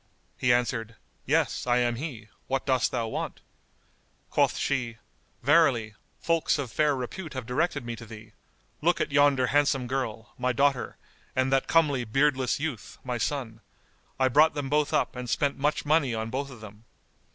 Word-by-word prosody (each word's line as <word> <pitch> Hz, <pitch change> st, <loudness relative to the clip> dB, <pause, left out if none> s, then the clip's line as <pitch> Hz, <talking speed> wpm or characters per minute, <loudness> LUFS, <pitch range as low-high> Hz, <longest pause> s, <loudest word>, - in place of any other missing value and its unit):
He 125 Hz, -, +2 dB
answered, 115 Hz, -2 st, 0 dB, 0.3 s
"Yes, -, -, +1 dB
I 120 Hz, 0 st, +3 dB
am 120 Hz, -1 st, +1 dB
he: 120 Hz, -7 st, -6 dB, 0.2 s
what 135 Hz, 0 st, -1 dB
dost 130 Hz, -3 st, +2 dB
thou 115 Hz, -, -1 dB
want?" -, -, -4 dB, 0.9 s
Quoth -, -, +2 dB
she, 125 Hz, -5 st, -1 dB, 0.5 s
"Verily, 130 Hz, -7 st, +3 dB, 0.3 s
folks 165 Hz, -2 st, +1 dB
of 135 Hz, -5 st, -4 dB
fair 150 Hz, +1 st, +2 dB
repute 150 Hz, +7 st, -6 dB
have 130 Hz, -2 st, -4 dB
directed 125 Hz, +2 st, -1 dB
me 120 Hz, 0 st, -4 dB
to 115 Hz, -, -10 dB
thee. 110 Hz, 0 st, -12 dB, 0.5 s
Look 170 Hz, +3 st, +2 dB
at 155 Hz, -1 st, -1 dB
yonder 145 Hz, -2 st, +4 dB
handsome 145 Hz, -3 st, +2 dB
girl, 120 Hz, -3 st, -4 dB
my 125 Hz, 0 st, +1 dB
daughter, 140 Hz, 0 st, +1 dB, 0.4 s
and 130 Hz, +1 st, +1 dB
that 135 Hz, -, +2 dB
comely 145 Hz, -6 st, +3 dB
beardless 130 Hz, +2 st, +1 dB
youth, 145 Hz, -8 st, -5 dB
my 125 Hz, -2 st, -3 dB
son; 115 Hz, -4 st, -3 dB, 0.6 s
I 130 Hz, -, +4 dB
brought 150 Hz, +6 st, +4 dB
them 145 Hz, -2 st, -3 dB
both 150 Hz, 0 st, +2 dB
up -, -, +1 dB
and 125 Hz, -1 st, -5 dB
spent 140 Hz, +2 st, 0 dB
much 150 Hz, +2 st, 0 dB
money 145 Hz, -5 st, +2 dB
on 110 Hz, 0 st, -3 dB
both 140 Hz, +2 st, -3 dB
of 125 Hz, -5 st, -12 dB
them. 105 Hz, +1 st, -12 dB
130 Hz, 170 wpm, -27 LUFS, 120-145 Hz, 0.9 s, yonder